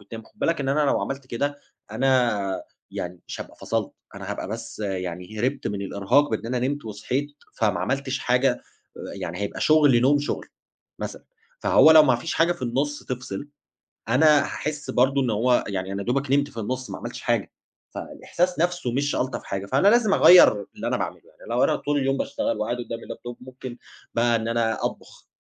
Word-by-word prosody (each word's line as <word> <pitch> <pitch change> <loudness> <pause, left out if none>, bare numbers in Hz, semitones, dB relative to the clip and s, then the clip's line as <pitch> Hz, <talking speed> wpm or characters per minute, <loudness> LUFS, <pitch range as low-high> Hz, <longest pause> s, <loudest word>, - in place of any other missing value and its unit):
وتنام، 115 +3 -9
خُد 210 - -24
بالك 165 -6 0
إن 135 - -2
أنا 145 +2 +2
لو 145 - +2
عملت 135 -1 -4
كده 145 +4 -2 0.3
أنا 115 -5 +1 0.3
يعني 90 0 -6
مش - - -7
هابقى - - -9
فَصَلت، - - -2 0.2
أنا - - -7
هابقى - - -4
بس - - -6
يعني 95 +1 -4
هربت 135 +3 -1
من 100 -1 -3
الإرهاق 100 +9 +2
بإن 110 +1 -2
أنا 125 +1 -1
نمت 145 -3 -4
وصحيت، 125 +7 -3 0.2
فما 105 -6 +1
عملتش 135 -1 -1
حاجة، 125 0 +2 0.5
يعني - - -5
هيبقى 100 0 -4
شغل 150 -6 +5
نوم 140 +4 +4
شغل 145 - -3 0.5
مثلًا، - - -6 0.4
فهو 160 - +6
لو 160 -1 +9
ما 130 -5 +4
فيش 165 +8 -4
حاجة 170 +2 +3
في 130 - -12
النُص 140 +5 -1
تفْصِل 125 0 -5 0.6
أنا 150 +3 +5
هاحس 150 -1 -4
برضو 135 +2 +3
إن 125 - 0
هو 120 +4 +2
يعني 95 -1 -3
أنا 100 +1 -3
يا - - -6
دُوبَك 135 +2 0
نمت 145 +1 +3
في 115 - -8
النُص 130 +4 -3
ما - - -5
عملتش - - -7
حاجة، - - 0 0.4
فالإحساس 180 -1 -3
نَفْسه 175 -7 0
مش 140 +4 0
ألطف 130 +1 -2
حاجة، 100 0 -4
فأنا 135 - +2
لازم 220 -2 +5
أغيّر 110 - +7
اللي - - -4
أنا - - 0
باعمله، - - -4
يعني - - -16
لو - - +2
أنا - - +3
طول 145 0 -1
اليوم 135 0 +1
باشتغل 280 +1 -2
وقاعد 120 - -2
قدام 115 -1 -5
الlaptop 120 +1 -8
مُمكن 130 -1 -9 0.4
بقى 120 0 +3
إن 110 0 -2
أنا 115 -1 0
أطبخ، - - -7
130 Hz, 190 wpm, -24 LUFS, 110-145 Hz, 0.6 s, لو